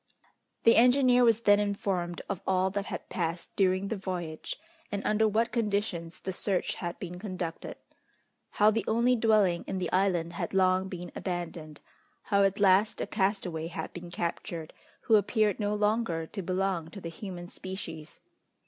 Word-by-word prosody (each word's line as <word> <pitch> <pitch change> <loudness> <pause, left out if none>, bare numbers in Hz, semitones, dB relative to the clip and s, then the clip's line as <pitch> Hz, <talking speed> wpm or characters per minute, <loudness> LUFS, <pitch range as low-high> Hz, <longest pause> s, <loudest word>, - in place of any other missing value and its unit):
The 230 - +6
engineer 250 +1 +5
was 230 -1 +4
then 205 -2 +5
informed 195 -4 -2
of 200 -3 -3
all 190 0 +2
that 200 0 -3
had - - -6
passed 170 -1 -3
during 190 0 +2
the 225 - -1
voyage, 180 -5 -5 0.3
and 205 -1 -3
under 220 +1 +3
what 225 +2 +1
conditions 200 -7 -2
the 190 - -3
search 190 0 -1
had 175 -1 -5
been 180 -1 -7
conducted; 180 -4 -5 0.7
how 210 +1 +4
the 225 +1 0
only 235 +3 +3
dwelling 215 -6 +3
in 190 - -2
the 180 -2 -2
island 180 -3 +1
had 175 - -4
long 185 0 +3
been 180 -1 -7
abandoned; 170 -4 -5 0.4
how 200 0 +2
at 195 0 +2
last 200 +2 +4
a - - -1
castaway 190 -5 -1
had 170 - -6
been 175 0 -8
captured, 170 -2 -4 0.3
who 220 - +5
appeared 210 0 +1
no 205 0 0
longer 210 -6 0
to 195 +5 -6
belong 185 -2 -1
to 200 - -9
the 170 - -6
human 175 0 -7
species. 180 -5 -8
190 Hz, 165 wpm, -29 LUFS, 175-210 Hz, 0.7 s, The